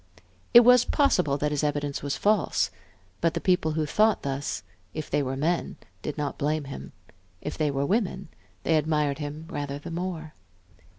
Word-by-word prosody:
It 240 - +10
was 250 0 +7
possible 180 - +2
that 150 +1 0
his 150 0 -1
evidence 145 -1 -1
was 140 0 -2
false; 195 - +2 0.5
but 165 0 +2
the - - 0
people 180 -3 +2
who 155 0 0
thought 215 +8 +2
thus, 140 -3 -3 0.3
if 155 - -5
they - - +2
were 135 -1 -2
men, 165 +5 -1 0.2
did 150 - -4
not 145 -1 -3
blame 150 +1 0
him; 100 - -8 0.5
if 150 - -5
they 155 -2 +1
were 140 0 0
women, 190 -2 -1 0.3
they 160 - +3
admired 150 -1 +1
him 150 +1 -5
rather 145 -3 -4
the 145 - -8
more. 165 -2 -4
150 Hz, 175 wpm, -27 LUFS, 145-175 Hz, 0.5 s, It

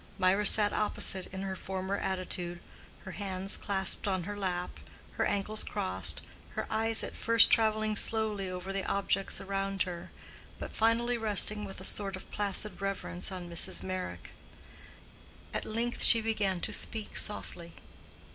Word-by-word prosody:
Mirah 195 +2 +3
sat 210 0 +6
opposite 195 -3 +1
in 190 0 -7
her 190 -1 -4
former 190 +1 -4
attitude, 180 -2 -3 0.4
her 190 - -8
hands 190 0 0
clasped 195 0 -1
on 185 -2 -1
her 205 +4 -5
lap, 180 -3 -4 0.3
her - - -1
ankles 210 +2 0
crossed, 95 -3 0 0.3
her - - -2
eyes 225 0 +3
at - - -6
first 230 -1 +6
traveling 215 -1 +2
slowly 210 -3 +2
over 185 +1 -6
the 195 -1 -2
objects 195 -1 0
around 195 0 -2
her, 175 -2 -7 0.5
but - - -8
finally 235 +2 +1
resting 210 -1 +2
with 195 -2 -9
a - - -9
sort 195 -1 +2
of 190 - -12
placid 205 -1 -2
reverence 195 -2 -3
on 180 -2 -6
Mrs. 170 -1 +1
Meyrick. 185 - -5 1.2
At - - -3
length 235 +2 -1
she 230 - +8
began 210 -5 -1
to - - -2
speak 220 -2 -1
softly. 170 -5 -2
195 Hz, 150 wpm, -30 LUFS, 185-215 Hz, 1.2 s, she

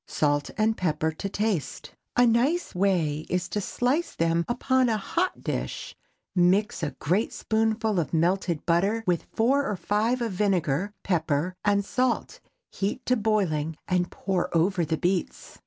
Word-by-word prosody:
Salt 145 -1 0
and 220 +1 +2
pepper 160 -2 0
to 195 +5 -5
taste. 200 - -2 0.3
A 245 - +6
nice 255 +10 +2
way 170 -5 0
is 180 0 -1
to 210 - -2
slice 260 - -1
them 165 0 +1
upon 255 +1 +2
a 220 - +1
hot 340 - -2
dish, - - -4 0.4
mix 185 +4 +2
a 150 -2 -3
great 185 +9 0
spoonful 220 -2 0
of 165 - -2
melted 170 0 0
butter 195 +7 +2
with 175 -2 0
four 275 +5 +2
or 210 - -1
five 215 +6 0
of 230 - -2
vinegar, 185 -2 0
pepper 165 -1 0
and 200 -1 +2
salt, 250 +1 -1 0.3
heat 195 +1 -3
to 250 - +3
boiling, 180 -9 0
and 180 -1 +1
pour 185 -2 -2
over 175 +2 +2
the 160 0 -1
beets. 180 +1 -2
195 Hz, 155 wpm, -26 LUFS, 170-220 Hz, 0.4 s, A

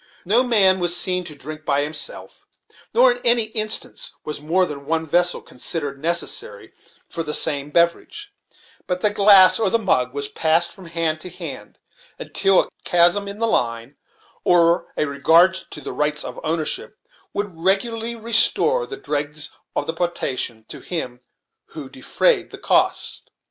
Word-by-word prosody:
No 215 +7 +4
man 200 -7 +4
was 175 0 +1
seen 180 0 +2
to 150 - -7
drink 155 +3 -9
by 140 -2 +1
himself, 160 - -6 0.4
nor - - +5
in - - -5
any 235 -1 +3
instance 215 -1 +1 0.2
was 150 -1 -5
more 175 +5 +1
than 140 -3 -8
one 160 0 -1
vessel 175 +3 +1
considered 140 +1 -2
necessary 175 - -2 0.3
for 165 - -5
the 150 -2 -3
same 145 0 -1
beverage; 170 - -1 0.5
but 180 0 -2
the 210 - +3
glass 200 -2 +6
or 220 - +1
the 230 - +2
mug 125 - 0
was 140 0 -3
passed 160 +3 +1
from 190 -4 -13
hand 165 -2 -1
to 180 - -7
hand - - -8 0.4
until 195 -1 +2
a - - -13
chasm 175 +4 +3
in 200 +1 -7
the 230 - 0
line 115 - -2 0.5
or 170 0 +3
a - - +1
regard 160 +6 +4
to 190 -4 -8
the - - -7
rights 150 0 -1
of - - -8
ownership 160 +6 -2 0.3
would 205 -2 -4
regularly 225 +7 0
restore 235 - +2
the 400 - -7
dregs 150 - -3 0.2
of - - -1
the 160 - -3
potation 135 -9 -3
to - - -9
him 125 -8 -5 0.6
who - - -7
de - - -15
frayed - - +1
the - - -10
cost. - - 0
175 Hz, 165 wpm, -21 LUFS, 150-205 Hz, 0.6 s, glass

